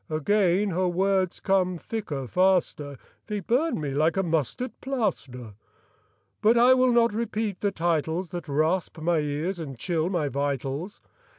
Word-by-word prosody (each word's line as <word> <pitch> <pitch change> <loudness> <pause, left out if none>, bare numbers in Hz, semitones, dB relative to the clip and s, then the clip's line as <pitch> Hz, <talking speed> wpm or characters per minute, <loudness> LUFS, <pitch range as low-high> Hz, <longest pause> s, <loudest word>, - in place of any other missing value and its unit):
Again 190 +4 +2
her 180 +2 +1
words 190 +1 +1
come 185 -2 +1
thicker, 165 - -5
faster, 175 -4 +1 0.3
They 210 -2 -2
burn 255 - 0
me 145 -2 -3
like 155 +5 +1
a 190 - +2
mustard 165 - -1
plaster. 160 - -3 0.9
But 225 +3 +4
I 245 +2 +7
will 255 -1 +3
not 235 -2 +3
repeat 220 -3 -2
the 205 - +1
titles 165 0 -1
That 175 -2 -6
rasp 160 +6 0
my 165 +1 +1
ears 150 +5 -2
and 140 -6 -6
chill 165 +5 -1
my 170 -6 0
vitals. 140 - -3
180 Hz, 150 wpm, -26 LUFS, 155-205 Hz, 0.9 s, I